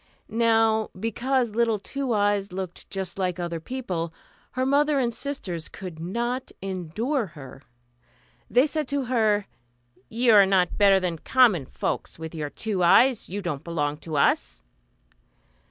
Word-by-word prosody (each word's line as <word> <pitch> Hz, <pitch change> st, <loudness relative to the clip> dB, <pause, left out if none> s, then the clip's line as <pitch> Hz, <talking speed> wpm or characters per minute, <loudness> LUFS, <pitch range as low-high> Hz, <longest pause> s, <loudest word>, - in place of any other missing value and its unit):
Now 225 Hz, -1 st, +2 dB
because 235 Hz, +3 st, 0 dB
little 230 Hz, -1 st, +2 dB
Two 270 Hz, +6 st, -4 dB
Eyes 205 Hz, -2 st, +1 dB
looked 185 Hz, -1 st, -6 dB
just 190 Hz, -1 st, -5 dB
like 180 Hz, -2 st, -1 dB
other 170 Hz, -1 st, -3 dB
people, 180 Hz, -6 st, -4 dB, 0.4 s
her 255 Hz, +1 st, 0 dB
mother 290 Hz, +2 st, +3 dB
and 240 Hz, -3 st, +1 dB
sisters 195 Hz, -, -4 dB
could 180 Hz, -5 st, -8 dB
not 235 Hz, +9 st, -3 dB
endure 195 Hz, -, -2 dB
her. 135 Hz, -4 st, -12 dB, 0.9 s
They 250 Hz, +4 st, +4 dB
said 305 Hz, -1 st, -1 dB
to 280 Hz, -1 st, -1 dB
her, 215 Hz, -4 st, +2 dB, 0.6 s
"You 235 Hz, 0 st, +3 dB
are 200 Hz, -2 st, +7 dB
not 185 Hz, -3 st, +2 dB
better 200 Hz, -1 st, +6 dB
than 175 Hz, -3 st, -2 dB
common 215 Hz, -, +3 dB
folks, -, -, -3 dB
with 160 Hz, 0 st, -7 dB
your 150 Hz, -3 st, -4 dB
two 205 Hz, +3 st, -3 dB
eyes; 240 Hz, +7 st, +4 dB
you 200 Hz, +2 st, -4 dB
don't 150 Hz, -6 st, -3 dB
belong 150 Hz, -3 st, -2 dB
to 160 Hz, -1 st, -5 dB
us." 140 Hz, -, +1 dB
205 Hz, 145 wpm, -25 LUFS, 175-245 Hz, 0.9 s, are